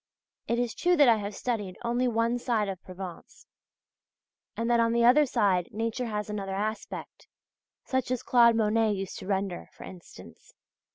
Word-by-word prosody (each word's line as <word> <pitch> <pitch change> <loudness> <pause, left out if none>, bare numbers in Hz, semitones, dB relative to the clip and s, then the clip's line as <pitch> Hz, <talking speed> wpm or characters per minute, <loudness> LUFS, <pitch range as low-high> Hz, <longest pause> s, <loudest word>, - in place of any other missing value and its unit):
It 235 - 0
is 240 -2 -1
true 355 0 +2
that 290 -3 +6
I 230 -2 +6
have 205 -1 -5
studied 210 -7 -3
only 240 +2 +1
one 230 +1 0
side 230 -4 0
of 190 -2 -6
Provence, 185 -2 -10 1.1
and 230 - -1
that 235 0 +3
on 230 0 +2
the 235 0 +3
other 280 +4 +6
side 185 -7 +1
nature 230 +3 -2
has 210 -2 -3
another 200 -2 -4
aspect, 215 +2 -5 0.6
such 260 -1 -1
as 255 -2 -2
Claude 235 -2 +5
Monet 220 0 +2
used 195 -2 -5
to - - -9
render, 195 -2 -2
for - - -12
instance. 90 - -13
225 Hz, 170 wpm, -28 LUFS, 195-240 Hz, 1.1 s, that